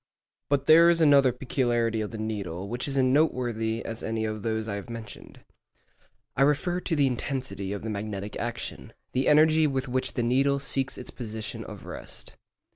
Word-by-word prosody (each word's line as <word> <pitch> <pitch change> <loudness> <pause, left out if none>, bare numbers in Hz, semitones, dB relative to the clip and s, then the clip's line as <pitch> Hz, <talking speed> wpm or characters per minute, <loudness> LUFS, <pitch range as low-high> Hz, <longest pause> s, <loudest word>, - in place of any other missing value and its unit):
But 140 -1 +1
there 165 +3 +8
is 170 -1 +3
another 140 -4 +6
peculiarity 120 -3 0
of 105 - -3
the 115 - -7
needle 100 -4 -4
which 120 +6 -3
is 140 -1 -1
as 130 - +4
noteworthy 120 -5 +1
as 115 0 -5
any 110 0 -2
of 110 -1 -3
those 110 0 -2
I 105 - -3
have 100 +3 -6
mentioned. 115 -3 -9 0.9
I - - 0
refer 150 +6 +2
to 175 -2 -1
the 145 -2 +3
intensity 130 -6 -3
of 100 0 -4
the 110 - -3
magnetic 105 0 -5
action—the 120 +2 -4
energy 155 +1 +5
with 135 -2 -2
which 130 +1 -1
the 120 - -1
needle 135 +4 +2
seeks 135 -1 0
its 125 - -7
position 110 -3 -6
of - - -10
rest. - - -8
120 Hz, 180 wpm, -27 LUFS, 110-140 Hz, 0.9 s, there